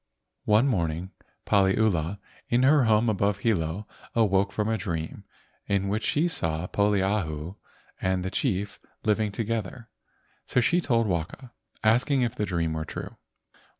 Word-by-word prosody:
One 110 +4 +4
morning 85 - -1 0.3
Paliula 95 -3 +2 0.3
in 120 +2 +3
her 140 -1 +5
home 110 +1 +3
above 100 -2 +1
Hilo 100 -2 -1 0.3
awoke 100 -3 +3
from 105 +1 -1
a 110 - +1
dream 85 -6 -4 0.4
in 100 -1 0
which 105 +3 0
she 155 +4 +2
saw 80 - -2
Poliahu 95 -5 0 0.5
and 95 0 0
the 95 - -3
chief 100 -6 -1 0.2
living 105 -1 +1
together, 115 +1 -4 0.6
so - - +2
she 170 +8 +3
told 115 -7 +2
Waka, 95 +7 -3 0.3
asking 125 +5 +3
if 120 0 -1
the 105 -4 -2
dream 85 -3 -1
were 80 0 -2
true. - - -7
105 Hz, 140 wpm, -27 LUFS, 90-115 Hz, 0.6 s, her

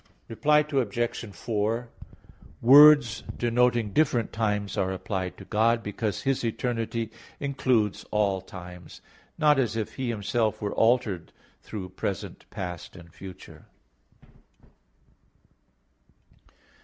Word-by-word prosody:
Reply 150 +6 +3
Obj. 120 -3 -1
4: 110 +4 -2 0.7
Words 145 -1 +7
denoting 120 -3 +1
different 125 -8 +1
times 105 -2 -1
are 95 0 0
applied 95 -1 -4
to - - -11
God, 115 +1 +2
because 105 0 -3
His 135 -2 0
eternity 115 -1 -2 0.3
includes 130 -7 0
all 100 -3 +1
times; 90 -1 -11 0.4
not 150 -2 +4
as 115 -4 0
if 110 -2 -4
He 130 -2 -2
Himself 110 0 -1
were 100 -1 -3
altered 115 -6 +1 0.3
through 95 -4 -7
present, - - -5
past 90 -4 -6
and 85 -2 -14
future. 95 0 -12
115 Hz, 105 wpm, -27 LUFS, 100-120 Hz, 0.7 s, Words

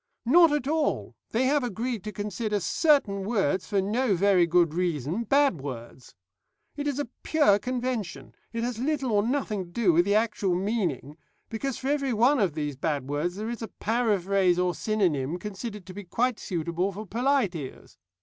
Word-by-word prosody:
"Not 330 +6 +6
at 295 -3 -1
all; 315 +1 0 0.2
they 240 +4 +1
have 285 +1 +2
agreed 235 -1 -3
to 215 - -4
consider 210 +1 -2
certain 210 - +2
words, 195 -3 0
for 200 -3 +1
no 220 +2 +1
very 185 -1 +4
good 170 -2 +3
reason, 170 - -1
bad 275 - +3
words. 125 -2 -8 0.6
It 290 0 -3
is 285 -2 -1
a 290 - -2
pure 210 -11 +3
convention; 230 - -4 0.2
it 230 0 -3
has 240 -2 -3
little 270 -1 -1
or 205 -1 +3
nothing 220 -5 -1
to - - -16
do 185 -1 +2
with 175 +2 +4
the 200 +1 +2
actual 210 -4 +1
meaning, 180 - -2 0.3
because 240 +3 -3
for 265 - -3
every 280 -3 0
one 250 +6 +4
of 190 -7 +1
these 150 -2 -3
bad 140 -1 -2
words 150 +5 -2
there 215 +3 -4
is 240 - -6
a 225 - -4
paraphrase 200 -6 +1
or 180 0 +1
synonym 175 -9 0
considered 210 +1 -7
to 185 - -10
be 205 +2 -7
quite 235 +6 -1
suitable 175 +2 -2
for 210 +3 -7
polite 245 -1 +1
ears. 145 -6 -9
205 Hz, 180 wpm, -27 LUFS, 175-245 Hz, 0.6 s, Not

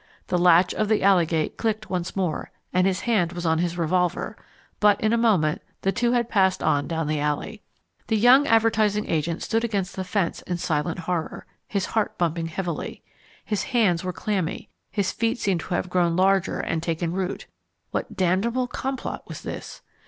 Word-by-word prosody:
The 180 - +2
latch 175 0 +5
of 215 - 0
the 215 - +2
alley 190 -4 +5
gate 160 -1 -1
clicked 220 -2 -2
once 180 -2 -2
more, 180 -5 -2 0.2
and 185 +1 +3
his 185 -1 0
hand 195 -8 +1
was 175 0 -5
on 160 0 +2
his 175 0 -1
revolver; 180 +1 0 0.4
but 205 -1 +4
in 220 +1 +1
a - - +5
moment 200 -10 +2 0.2
the 195 - +2
two 240 +3 +1
had 240 -2 +1
passed 190 -4 +2
on 145 0 +2
down 165 -1 -2
the 150 0 -1
alley. 150 +8 -2 0.5
The 220 - +2
young 255 +6 +6
advertising 220 -2 +3
agent 165 +1 -1
stood 225 +1 0
against 200 -5 -2
the 190 - -3
fence 185 -2 -1
in 180 - -3
silent 170 0 -1
horror, 170 -1 -3 0.2
his 200 -3 -1
heart 220 -2 -1
bumping 165 -1 0
heavily. 170 -1 -4 0.4
His 210 -2 -1 0.2
hands 180 -7 +3
were 185 - -2
clammy, 190 -1 -3 0.2
his 200 -3 -1
feet 230 0 0
seemed 195 -6 0
to 175 +2 -3
have 180 - -1
grown 175 -2 +1
larger 190 +1 +2
and 165 - -1
taken 165 0 -2
root. 185 0 -3 0.5
What - - -3
damnable 195 +8 +1
complot 265 +2 -4
was - - -8
this? - - -7
185 Hz, 185 wpm, -24 LUFS, 170-215 Hz, 0.5 s, young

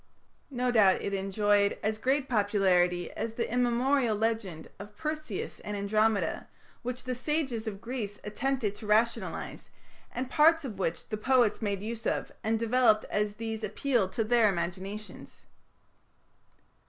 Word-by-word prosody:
No 250 -2 0
doubt 205 -5 +4
it 200 - -2
enjoyed 200 +1 +2
as 215 0 -1
great 270 +3 +1
popularity 190 -6 +2
as 225 0 -4
the 235 - -1
immemorial 245 0 +2
legend 215 -7 -2
of 205 +1 -11
Perseus 305 - -4
and 210 0 -5
Andromeda, 215 +1 +1 0.3
which 250 +1 -5
the 255 - -2
sages 255 -4 -2
of 200 -2 -4
Greece 230 -4 -4
attempted 230 0 -1
to 215 - -9
rationalize, 225 +3 0 0.4
and 250 +2 -3
parts 315 +3 +4
of 210 -7 -6
which 165 -3 -2
the 215 - -2
poets 245 -1 +2
made 200 -2 -2
use 225 +1 -4
of - - -1
and 225 +1 +1
developed 230 -1 +3
as 210 0 0
these 225 0 -5
appealed 215 -1 0
to 225 - +1
their 225 -1 +4
imaginations. 190 +4 -5
220 Hz, 140 wpm, -29 LUFS, 205-245 Hz, 0.4 s, doubt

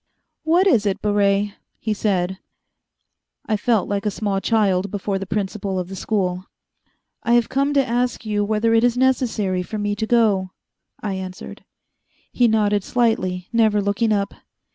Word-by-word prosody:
"What 340 +4 +3
is 230 - +3
it, 195 - -1
Baret?" 205 -1 +1 0.2
he 220 - -2
said 190 -3 -1 1.1
I 215 - 0
felt 215 -1 +1
like 200 0 -2
a 210 - +1
small 200 -1 -2
child 200 -4 +1
before 200 0 -2
the 195 - -6
principal 195 -1 -2
of 180 -1 -3
the 195 - -6
school. 185 -2 -2 0.7
"I 235 - +1
have 240 -1 +3
come 275 +2 +1
to 275 -1 +3
ask 245 0 -1
you 210 -1 0
whether 215 +2 +1
it 225 0 +4
is 245 0 +2
necessary 235 -8 +1
for 215 +4 -5
me 205 0 -1
to 220 - -2
go," 210 -6 +2 0.5
I 205 -2 -2
answered. 185 -1 -7 0.7
He 245 - +3
nodded 210 -2 +2
slightly, 185 -7 0
never 220 -2 +3
looking 205 +3 0
up. 200 -1 0
205 Hz, 165 wpm, -21 LUFS, 195-230 Hz, 1.1 s, it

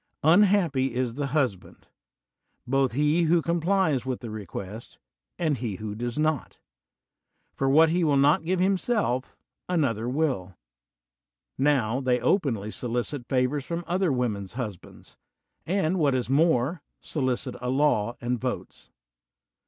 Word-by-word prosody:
Unhappy 165 - +3
is 125 -2 -1
the 140 +2 -2
husband, 130 - -2 0.8
both 135 -1 +1
he 150 +5 +2
who 170 +2 +4
com 170 +1 -1
plies 175 -6 +2
witii 130 0 -4
the 115 - -6
request, 105 +1 -7 0.4
and 155 -6 0
he 115 -6 -3
who 105 +2 -5
does 120 +3 -4
not; 155 -3 -1 1.0
for 135 - 0
what 160 +4 +6
he 175 +2 +1
will 145 -3 +3
not 145 +6 +4
give 180 +2 0
himself, 190 - 0 0.3
another 125 -10 0
will. 125 - -1 1.0
Now 130 -4 +1
they 125 -2 +1
openly 115 - 0
solicit 120 +2 -3
favors 130 +2 0
from 170 0 -3
other 180 -1 +1
wom 125 -4 0
en's 100 -1 -9
husbands; 110 -7 -8 0.5
and, 185 0 +1
what 140 -4 +3
is 125 0 -2
more, 155 +1 +2 0.2
solicit 130 -5 -2
a 125 - -2
law 125 -5 +1
and 120 0 -2
votes. - - -5
135 Hz, 135 wpm, -26 LUFS, 120-160 Hz, 1.0 s, what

